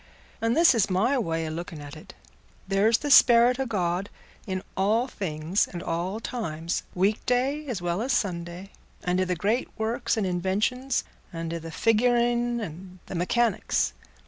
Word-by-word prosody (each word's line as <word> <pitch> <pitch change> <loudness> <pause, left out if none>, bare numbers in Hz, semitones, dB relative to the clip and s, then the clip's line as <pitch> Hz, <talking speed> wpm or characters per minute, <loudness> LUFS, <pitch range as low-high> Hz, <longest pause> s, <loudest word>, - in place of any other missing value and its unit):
And 230 +3 +1
this 330 -3 +7
is 225 -4 +2
my 205 +9 +2
way 165 -6 -1
o' - - -4
looking 165 0 -6
at 145 0 -9
it: 155 - -13 0.5
there's 205 +4 +3
the 290 - -3
sperrit 245 0 +7
o' 265 - -1
God 185 -2 -1 0.4
in 185 -1 -3
all 215 +5 +2
things 170 - -1
and 175 -1 -7
all 180 +6 -2
times—weekday 230 - -1
as 215 -9 -4
well 175 +3 -1
as 255 +3 -1
Sunday—and 180 -2 -3
i' - - +3
the 180 0 -1
great 210 +8 0
works 220 +1 -1
and 215 - 0
inventions, 205 +9 0 0.3
and 165 -1 -4
i' 170 - -3
the 165 0 -8
figuring 240 +4 +2
and 185 -1 -8
the - - -8
mechanics. 220 +7 +1
195 Hz, 155 wpm, -26 LUFS, 175-240 Hz, 0.5 s, this